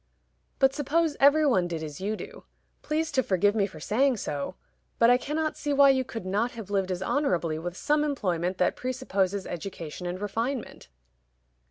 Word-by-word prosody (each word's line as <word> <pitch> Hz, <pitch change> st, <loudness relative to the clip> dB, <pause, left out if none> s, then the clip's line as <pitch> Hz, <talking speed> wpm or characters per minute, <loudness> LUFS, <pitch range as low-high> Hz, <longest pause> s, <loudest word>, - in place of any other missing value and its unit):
"But 270 Hz, 0 st, +4 dB
suppose 300 Hz, +2 st, +1 dB
every 295 Hz, +3 st, +6 dB
one 190 Hz, -11 st, +3 dB
did 165 Hz, -2 st, -4 dB
as 150 Hz, +1 st, -7 dB
you 210 Hz, +3 st, -1 dB
do? -, -, -10 dB, 0.4 s
Please 310 Hz, +1 st, -1 dB
to 265 Hz, -, +2 dB
forgive 205 Hz, -2 st, +2 dB
me 205 Hz, -3 st, +1 dB
for 165 Hz, -5 st, -12 dB
saying 250 Hz, -, +2 dB
so; 150 Hz, 0 st, -4 dB, 0.4 s
but 230 Hz, +1 st, +6 dB
I 245 Hz, -, +6 dB
cannot 310 Hz, +3 st, -2 dB
see 290 Hz, -1 st, -1 dB
why 280 Hz, 0 st, +7 dB
you 260 Hz, -1 st, +1 dB
could 225 Hz, -6 st, -7 dB
not 210 Hz, +6 st, 0 dB
have 220 Hz, -4 st, -8 dB
lived 195 Hz, -2 st, 0 dB
as 185 Hz, 0 st, -2 dB
honorably 175 Hz, -, 0 dB
with 175 Hz, +2 st, -5 dB
some 300 Hz, 0 st, +2 dB
employment 185 Hz, -, -1 dB
that 180 Hz, -, +2 dB
presupposes 200 Hz, -7 st, -1 dB
education 175 Hz, -1 st, -6 dB
and 180 Hz, +1 st, -4 dB
refinement." 230 Hz, -, -3 dB
210 Hz, 180 wpm, -27 LUFS, 185-275 Hz, 0.4 s, why